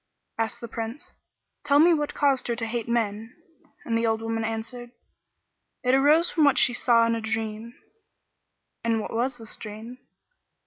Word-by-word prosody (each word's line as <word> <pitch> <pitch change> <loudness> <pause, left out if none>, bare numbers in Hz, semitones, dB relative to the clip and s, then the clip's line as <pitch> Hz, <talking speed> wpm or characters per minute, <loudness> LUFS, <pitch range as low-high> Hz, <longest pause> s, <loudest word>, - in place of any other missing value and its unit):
Asked 225 0 -2
the 235 - -6
Prince 225 +4 -7 0.5
"Tell 285 -1 +3
me 335 +4 +6
what 295 -2 -2
caused 280 -3 +2
her 235 - -1
to 230 0 -2
hate 230 0 -3
men;" 225 0 -2 0.5
and 230 - -1
the 230 0 +1
old 225 0 0
woman 225 0 -2
answered, 225 +2 -5 0.9
"It 250 0 +2
arose 295 +5 +4
from 320 - +2
what 285 -2 +4
she 245 - +5
saw 235 -1 +4
in 230 - +1
a 230 - -2
dream." 220 +1 -4 1.1
"And 230 -1 +1
what 215 - -6
was 245 +3 -1
this 225 -2 -6
dream?" 220 +4 -9
230 Hz, 170 wpm, -25 LUFS, 225-255 Hz, 1.1 s, me